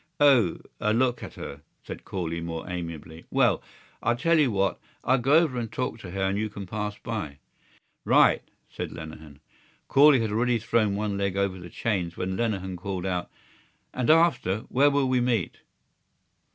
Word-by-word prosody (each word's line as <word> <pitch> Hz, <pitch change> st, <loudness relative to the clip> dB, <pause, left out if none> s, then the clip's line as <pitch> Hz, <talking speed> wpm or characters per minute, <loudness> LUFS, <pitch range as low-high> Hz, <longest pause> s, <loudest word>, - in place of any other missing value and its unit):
"O.... 130 Hz, -, +5 dB, 0.2 s
A 105 Hz, +1 st, +1 dB
look 125 Hz, 0 st, +1 dB
at -, -, -8 dB
her?" 70 Hz, +1 st, -8 dB, 0.2 s
said -, -, -8 dB
Corley, 85 Hz, -3 st, -3 dB
more 85 Hz, -1 st, -5 dB
amiably. 85 Hz, -2 st, -7 dB
"Well... -, -, +3 dB, 0.4 s
I'll 120 Hz, -, +2 dB
tell 165 Hz, +6 st, +2 dB
you 145 Hz, -4 st, +4 dB
what. 100 Hz, -3 st, 0 dB, 0.2 s
I'll 130 Hz, +1 st, +3 dB
go 135 Hz, +4 st, +2 dB
over 155 Hz, -7 st, +3 dB
and 115 Hz, -2 st, -4 dB
talk 125 Hz, -2 st, -3 dB
to 95 Hz, -, -9 dB
her 95 Hz, +2 st, -3 dB
and 95 Hz, +1 st, 0 dB
you 110 Hz, 0 st, -1 dB
can 100 Hz, -1 st, -7 dB
pass 105 Hz, +2 st, -4 dB
by." 105 Hz, -12 st, -5 dB, 0.7 s
"Right!" -, -, +5 dB, 0.3 s
said -, -, -6 dB
Lenehan. 80 Hz, -2 st, -10 dB, 0.5 s
Corley 140 Hz, -1 st, +6 dB
had 110 Hz, -2 st, -1 dB
already 120 Hz, +3 st, +2 dB
thrown 110 Hz, -2 st, +1 dB
one 100 Hz, -1 st, -2 dB
leg 100 Hz, -1 st, -1 dB
over 100 Hz, -2 st, 0 dB
the 90 Hz, -1 st, -10 dB
chains 90 Hz, -6 st, -2 dB
when 95 Hz, +1 st, -2 dB
Lenehan 95 Hz, -5 st, -2 dB
called 95 Hz, 0 st, -4 dB
out: 90 Hz, -2 st, -2 dB, 0.6 s
"And 125 Hz, +1 st, -1 dB
after? 155 Hz, -, +3 dB
Where 140 Hz, +3 st, +4 dB
will 140 Hz, -1 st, +1 dB
we 130 Hz, -1 st, +2 dB
meet?" 120 Hz, -6 st, 0 dB
105 Hz, 175 wpm, -26 LUFS, 90-125 Hz, 0.7 s, Corley